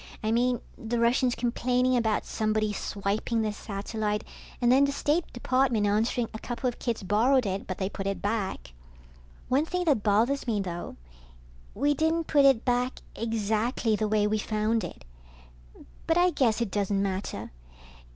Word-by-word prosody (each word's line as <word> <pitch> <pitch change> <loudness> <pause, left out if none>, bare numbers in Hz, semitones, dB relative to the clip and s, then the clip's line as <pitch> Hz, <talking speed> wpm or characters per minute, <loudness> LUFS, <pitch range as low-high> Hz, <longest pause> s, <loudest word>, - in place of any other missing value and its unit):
I 215 - 0
mean, 245 +1 +2 0.2
the 230 +1 -2
Russians 240 +1 +2
complaining 250 +1 +1
about 220 -3 +1
somebody 215 -1 0
swiping 205 +3 -1
their 215 -1 -1
satellite 210 +1 -3 0.4
and 240 -1 +3
then 270 +2 +6
the 280 - 0
State 300 +4 0
Department 250 -3 +1
answering 225 +3 +1
a 220 - -6
couple 245 +2 -3
of 245 - -3
kids 230 -4 -2
borrowed 235 +6 +3
it, 195 0 -3
but 185 - -4
they 190 - -1
put 195 0 -5
it 195 - -2
back. 195 - -3 0.7
One 270 +4 +2
thing 360 +2 -2
that 285 -9 +3
bothers 225 +7 +2
me 220 -3 +1
though, 175 -3 -5 0.8
we 290 +5 +2
didn't 320 +3 +1
put 285 -2 +4
it 265 -4 +4
back 245 0 0
exactly 225 +1 0
the 215 0 -1
way 210 0 +2
we 215 +1 +1
found 215 +1 0
it. - - -8 1.0
But 325 - +3
I 355 +1 +4
guess 240 -7 +1
it 225 -5 -1
doesn't 200 0 0
matter. 195 0 -4
225 Hz, 165 wpm, -27 LUFS, 210-255 Hz, 1.0 s, then